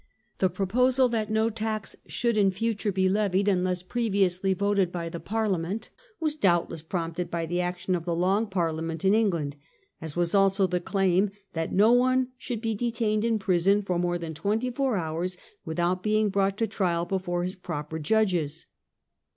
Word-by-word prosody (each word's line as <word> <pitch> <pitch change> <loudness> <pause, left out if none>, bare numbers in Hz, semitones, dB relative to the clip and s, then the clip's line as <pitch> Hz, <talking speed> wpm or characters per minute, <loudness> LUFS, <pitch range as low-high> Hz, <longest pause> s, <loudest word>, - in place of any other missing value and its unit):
The 190 - +3
proposal 250 +7 +2
that 220 -2 -1
no 220 +1 +2
tax 215 -1 -3
should 235 -2 0
in 200 -2 +4
future 205 +1 -1
be 190 0 +2
levied 200 0 +1
unless 180 -2 +1
previously 195 -4 +1
voted 200 -2 +1
by 170 -2 -4
the 170 - -6
Parliament 205 -2 -2 0.3
was 310 -2 -1
doubtless 175 - +1
prompted 170 +1 -3
by 170 -1 -2
the 175 +2 -1
action 180 +1 -2
of 170 -2 -2
the 170 -2 -1
Long 195 +6 +1
Parliament 165 -2 -2
in 190 - +5
England, 170 -10 +1 0.4
as 160 -2 -7
was 175 -1 0
also 195 0 +4
the 180 -1 0
claim 195 +1 +2 0.2
that 165 -1 -2
no 210 +4 +5
one 255 +1 +3
should 245 -3 -5
be 225 -1 -1
detained 225 -1 0
in 230 -1 +2
prison 195 +1 +2
for 180 -3 -1
more 175 0 0
than 165 -2 -6
twenty 215 +10 -1
four 265 -3 0
hours 175 +2 -3 0.3
with 160 +1 -5
out 175 +1 +1
being 215 +1 +2
brought 195 0 +1
to 225 - +1
trial 180 -5 0
before 175 -1 -2
his 185 +2 -3
proper 160 -3 -5
judges. 170 -4 0
190 Hz, 175 wpm, -27 LUFS, 175-215 Hz, 0.4 s, in